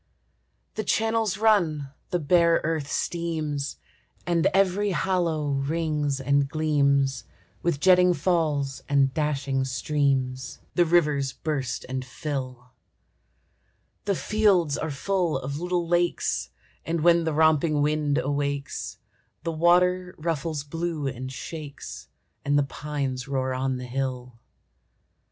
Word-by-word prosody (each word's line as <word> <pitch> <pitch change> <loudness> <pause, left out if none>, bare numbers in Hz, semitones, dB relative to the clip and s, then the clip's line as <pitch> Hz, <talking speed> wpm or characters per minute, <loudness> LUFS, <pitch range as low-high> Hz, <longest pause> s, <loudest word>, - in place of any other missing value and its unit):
The 215 - -3
channels 225 0 +1
run, 170 -11 +2 0.2
the 180 - +1
bare 170 +1 +4
earth 155 -3 -2
steams, 155 -4 -2 0.5
And 170 -2 +2
every 195 +1 +2
hollow 170 -6 0
rings 145 0 -1
and 140 +1 +2
gleams 140 -4 +1 0.4
With 170 -5 0
jetting 180 +1 +5
falls 150 -5 0
and 140 -2 +3
dashing 140 -3 0
streams; 130 -1 -1 0.2
The 175 - +4
rivers 150 -6 +2
burst 140 -6 -3
and 130 0 -3
fill; 130 -2 -5 1.3
The 200 -1 +1
fields 190 -8 +2
are 160 - -3
full 170 +2 0
of 140 +2 -4
little 175 0 -1
lakes, 175 0 0 0.3
And 165 0 -1
when 170 +1 +5
the 160 -1 -1
romping 155 -1 +3
wind 150 -1 +1
awakes 140 -1 -2 0.5
The 165 - -1
water 180 +2 +3
ruffles 155 -2 -2
blue 165 0 -3
and 130 -1 -4
shakes, 145 +2 -8 0.4
And 145 0 +2
the 145 - +4
pines 140 -3 -4
roar 130 -1 -1
on 130 0 -1
the 125 - -6
hill. 125 -2 -4
150 Hz, 120 wpm, -26 LUFS, 140-170 Hz, 1.3 s, jetting